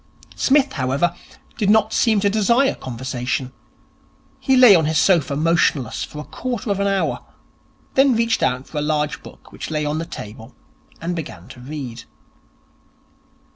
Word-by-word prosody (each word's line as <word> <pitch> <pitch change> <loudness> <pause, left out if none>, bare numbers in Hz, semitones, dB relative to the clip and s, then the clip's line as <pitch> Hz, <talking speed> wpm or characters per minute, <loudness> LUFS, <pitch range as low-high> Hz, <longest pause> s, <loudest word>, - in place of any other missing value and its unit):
Psmith, 280 0 +2
however, 140 +6 0 0.4
did 205 -3 +1
not 220 0 +3
seem 220 -3 +3
to 200 - +2
desire 235 +6 +3
conversation. 130 +1 -4 0.9
He 265 -2 +2
lay 250 -5 +9
on 165 -4 +4
his 155 0 0
sofa 160 -7 +3
motionless 155 -5 +1
for 150 - -9
a 150 - -5
quarter 245 - -4
of 200 - -1
an 200 - +1
hour, 195 -1 -1 0.7
then 270 -2 +4
reached 230 0 +1
out 125 +1 0
for 150 - -5
a - - -1
large 150 0 -1
book - - -15
which - - -7
lay 150 -1 -1
on 150 +1 -1
the 165 - -3
table, 110 -8 -10 0.4
and 170 +2 -3
began 95 - -7
to 130 -1 -12
read. 125 -3 -7
160 Hz, 160 wpm, -21 LUFS, 135-215 Hz, 0.9 s, lay